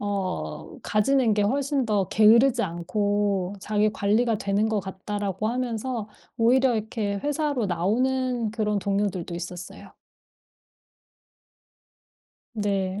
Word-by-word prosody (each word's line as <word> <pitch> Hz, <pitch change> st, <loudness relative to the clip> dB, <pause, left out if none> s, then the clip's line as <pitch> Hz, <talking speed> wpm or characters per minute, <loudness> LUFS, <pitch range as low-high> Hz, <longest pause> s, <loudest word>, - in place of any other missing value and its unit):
어 200 Hz, -, -4 dB
가지는 230 Hz, +2 st, +2 dB
게 210 Hz, -, +1 dB
훨씬 275 Hz, +4 st, 0 dB
더 205 Hz, -4 st, +1 dB
게으르지 235 Hz, +3 st, +5 dB
않고 200 Hz, +2 st, -1 dB
자기 210 Hz, +2 st, +1 dB
관리가 215 Hz, +3 st, +1 dB
되는 200 Hz, +2 st, 0 dB
것 215 Hz, -2 st, 0 dB
같다."라고 195 Hz, +1 st, -3 dB
하면서 240 Hz, -2 st, -3 dB, 0.3 s
오히려 250 Hz, +2 st, +4 dB
이렇게 215 Hz, -1 st, -2 dB
회사로 290 Hz, -4 st, 0 dB
나오는 240 Hz, +6 st, 0 dB
그런 210 Hz, -2 st, -1 dB
동료들도 195 Hz, -3 st, -1 dB
있었어요. 175 Hz, +1 st, -8 dB, 2.6 s
네. 200 Hz, -2 st, -1 dB
210 Hz, 240 characters per minute, -25 LUFS, 200-240 Hz, 2.6 s, 게으르지